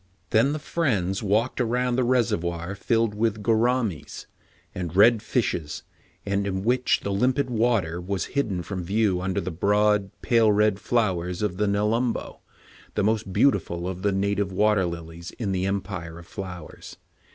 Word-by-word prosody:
Then 115 +4 +4
the 155 - -1
friends 110 - -1
walked 110 +5 +1
around 125 +1 0
the 130 - +2
reser 120 -3 +2
voir 85 +1 -4
filled 115 +2 0
with 110 0 -1
"gouramis'' 110 - 0 0.5
and 90 -2 -5
red 110 +3 +6
fishes, 90 - -2 0.4
and 100 0 0
in 95 -1 -2
which 125 +3 +2
the 100 - -3
limpid 125 +6 +1
water 110 -8 +1
was 95 -1 -2
hidden 105 -11 -1
from 95 -1 -5
view 100 0 +1
under 95 0 -1
the 95 - -4
broad, 105 +3 +2
pale 115 -3 +4
red 105 -1 +2
flowers 90 -6 0
of 95 -4 -1
the 105 +1 +1
"nelum 110 +4 +1
bo," - - -7 0.6
the 105 - +1
most 110 -1 0
beautiful 90 -7 +1
of 95 -1 -5
the 100 +1 +1
native 100 0 0
water 105 0 +2
lilies 85 0 -7
in 105 -5 -2
the 95 0 0
Empire 95 -4 -4
of 85 - -11
Flowers. 90 -3 -9
100 Hz, 165 wpm, -25 LUFS, 90-115 Hz, 0.6 s, red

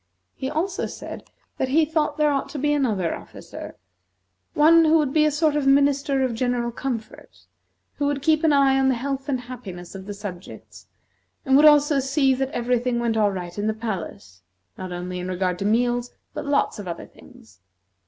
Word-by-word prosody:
He 265 - -4
also 365 +5 -2
said, - - -9 0.3
that 260 - +1
he 310 +4 +4
thought 305 -1 -1
there 300 -1 +3
ought 275 -1 -1
to - - -7
be 295 +2 +1
another 215 - 0
officer, - - -10 0.8
one 330 +2 +6
who 315 +1 +5
would 290 -4 0
be 305 -1 +4
a - - +4
sort 300 0 +1
of 290 -2 0
Minister 280 0 +3
of 255 -2 0
General 240 0 -1
Comfort, 225 - -6 0.5
who 285 - 0
would 285 -1 -2
keep 315 0 +3
an 320 - +4
eye 275 -1 +4
on 265 0 +3
the 260 - +2
health 275 +3 -4
and 260 -3 -1
happiness 205 -9 -9
of 195 0 -9
the 205 - -5
subjects, 195 -3 -10 0.6
and 265 -1 +3
would 295 +2 +7
also 295 -1 +5
see 270 0 +2
that 265 +1 -1
every 245 -1 0
thing 245 0 -1
went 235 -1 0
all 210 -2 +3
right 180 -2 -6
in 205 - -1
the 220 - 0
palace, 175 - -6 0.3
not 185 -1 -7
only 180 +1 -5
in 180 - -5
regard 180 -1 -1
to 200 - -2
meals, 240 +3 +1 0.2
but - - -6
lots 285 -6 +1
of 200 - -7
other 170 - -6
things. 250 -3 -19
260 Hz, 200 wpm, -23 LUFS, 210-285 Hz, 0.8 s, would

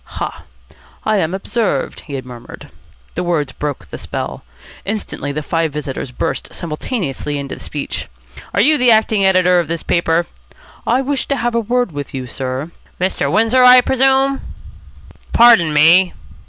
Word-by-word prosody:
"Ha! - - -5 0.6
I 215 -1 +2
am 170 +1 -1
observed!" 195 - -2
he 140 -2 -4
murmured. 120 -1 -11 0.4
The - - -3
words 160 -6 -1
broke 145 +1 -5
the - - -9
spell. - - -5 0.4
Instantly, 200 -8 -4
the 150 +2 -4
five 165 0 -1
visitors 145 -2 -5
burst 125 - -4
simultaneously 150 - -4
into 140 -1 -6
speech. 145 -2 -5 0.5
"Are - - +4
you 300 +2 +4
the 250 -1 +4
acting 220 -2 +3
editor 185 -2 +4
of 170 - -1
this 165 +1 -4
paper?" 170 0 +1 0.6
"I 250 +3 +3
wish 275 0 -2
to 280 - 0
have 240 -2 -1
a 235 - +2
word 245 -1 0
with 145 -1 -6
you, 130 -1 -4
sir." 130 +5 -4 0.3
"Mr. 185 +1 0
Windsor, 225 +5 +4
I 250 0 +9
presume?" 270 +1 +2 0.9
"Pardon 230 -9 +6
me!" 165 +5 +5
175 Hz, 155 wpm, -17 LUFS, 145-235 Hz, 0.9 s, I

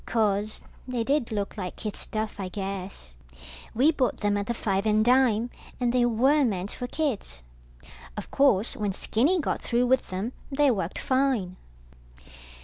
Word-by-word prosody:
Course, 215 -2 0 0.3
they 245 -2 -1
did 275 -1 0
look 205 0 -3
like 180 -3 -4
kid 210 -2 -5
stuff, 215 -1 -4
I 190 - -3
guess. 190 - -5 0.6
We 270 +7 +5
bought 265 -5 0
them 205 -1 +1
at 200 0 -2
the 235 - 0
five 200 -1 0
and 215 0 +3
dime, 245 -2 +3 0.3
and 245 -1 +1
they 245 -1 +4
were 265 +6 +3
meant 200 -5 -1
for 245 - -5
kids. 235 - -3 0.7
Of - - -6
course 250 -6 +3
when 205 -2 -1
Skinny 280 - +1
got 300 - -1
through 240 +1 +1
with 260 +1 +2
them, 195 +7 -3 0.2
they 280 0 +4
worked 190 -5 -2
fine. 260 -9 +1
225 Hz, 160 wpm, -27 LUFS, 200-255 Hz, 0.7 s, We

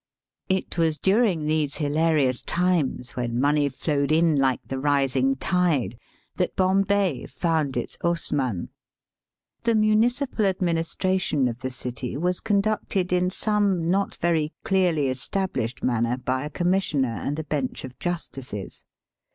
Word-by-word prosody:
It 190 -2 -1
was 160 -2 +2
during 190 - +2
these 155 -2 +1
hilarious 150 -3 +1
times, 170 -9 0
when 120 -1 -2
money 145 +1 +3
flowed 140 +1 -1
in 160 0 +4
like 135 -2 +2
the 135 - -4
rising 135 -2 +2
tide, 150 - +1 0.4
that - - -1
Bombay 195 -4 +1
found 150 0 -1
its - - -4
Hausmann. 145 - -1 0.9
The 230 -1 +2
municipal 220 +3 +2
administration 175 -4 0
of 120 0 -4
the 130 - -2
city 125 -1 -5
was 180 +3 0
conducted 200 -3 0
in 180 0 +2
some 195 -4 +1
not 195 +1 0
very 160 -3 0
clearly 175 -7 +2
established 130 - -2
manner 120 0 +1
by 130 +2 -2
a - - -4
Commissioner 170 -8 0
and 145 +2 -3
a 160 - -3
bench 145 -4 -3
of 130 -1 -9
justices. 135 - -5
155 Hz, 130 wpm, -25 LUFS, 130-185 Hz, 0.9 s, in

